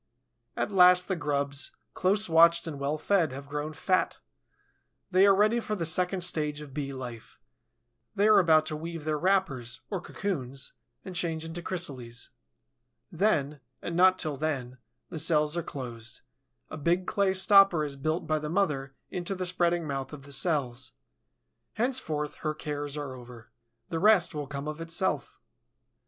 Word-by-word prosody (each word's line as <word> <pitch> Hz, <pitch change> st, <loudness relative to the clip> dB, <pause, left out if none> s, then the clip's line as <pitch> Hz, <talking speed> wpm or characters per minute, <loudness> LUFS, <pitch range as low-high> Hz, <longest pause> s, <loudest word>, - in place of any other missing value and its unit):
At -, -, -1 dB
last 180 Hz, -1 st, +6 dB
the 190 Hz, -, 0 dB
grubs, 140 Hz, -3 st, -2 dB, 0.2 s
close 200 Hz, +3 st, +2 dB
watched 170 Hz, +1 st, +5 dB
and 155 Hz, -4 st, -5 dB
well 140 Hz, +2 st, -1 dB
fed, 170 Hz, -1 st, +1 dB
have 140 Hz, +1 st, -8 dB
grown 150 Hz, +2 st, -4 dB
fat; 185 Hz, +4 st, 0 dB, 0.9 s
they 190 Hz, +2 st, +6 dB
are 195 Hz, -, +6 dB
ready 215 Hz, +4 st, +3 dB
for 215 Hz, -2 st, -3 dB
the 170 Hz, -5 st, -2 dB
second 180 Hz, +3 st, 0 dB
stage 150 Hz, -4 st, +1 dB
of 150 Hz, -3 st, -10 dB
Bee 140 Hz, -1 st, -3 dB
life. 125 Hz, -4 st, -8 dB, 0.8 s
They 205 Hz, +2 st, +3 dB
are 215 Hz, -2 st, +7 dB
about 160 Hz, -4 st, +4 dB
to 155 Hz, -, -3 dB
weave 165 Hz, 0 st, -6 dB
their 155 Hz, -1 st, -1 dB
wrappers, 155 Hz, -11 st, 0 dB
or 190 Hz, -4 st, -2 dB
cocoons, 140 Hz, -10 st, -4 dB, 0.3 s
and 185 Hz, -2 st, -7 dB
change 165 Hz, -2 st, -1 dB
into 165 Hz, +1 st, -5 dB
chrysales. 130 Hz, -10 st, -4 dB, 0.8 s
Then, 155 Hz, -6 st, +1 dB, 0.2 s
and 170 Hz, -, -5 dB
not 185 Hz, +1 st, +5 dB
till 155 Hz, -5 st, -2 dB
then, 130 Hz, -4 st, -3 dB, 0.3 s
the 160 Hz, -, -5 dB
cells 150 Hz, 0 st, +2 dB
are 170 Hz, -, 0 dB
closed; 120 Hz, -6 st, -7 dB, 0.5 s
a -, -, -5 dB
big 170 Hz, +5 st, +1 dB
clay 195 Hz, -1 st, +1 dB
stopper 190 Hz, -4 st, +6 dB
is 140 Hz, -1 st, -4 dB
built 155 Hz, +5 st, -2 dB
by 155 Hz, 0 st, 0 dB
the 150 Hz, 0 st, -5 dB
mother 150 Hz, -7 st, -1 dB, 0.2 s
into 180 Hz, +1 st, -3 dB
the 185 Hz, 0 st, -3 dB
spreading 175 Hz, -1 st, +1 dB
mouth 135 Hz, -2 st, -4 dB
of 145 Hz, -2 st, -9 dB
the 140 Hz, 0 st, -5 dB
cells. 135 Hz, -5 st, 0 dB, 0.8 s
Henceforth 215 Hz, -, -2 dB
her 155 Hz, -1 st, -3 dB
cares 145 Hz, -1 st, -4 dB
are 145 Hz, -3 st, -5 dB
over. 120 Hz, -2 st, -13 dB, 0.4 s
The 165 Hz, -, -2 dB
rest 190 Hz, -3 st, +4 dB
will 145 Hz, -2 st, -4 dB
come 140 Hz, +1 st, -5 dB
of 155 Hz, +1 st, -5 dB
itself. 165 Hz, -3 st, -1 dB
155 Hz, 165 wpm, -28 LUFS, 140-180 Hz, 0.9 s, are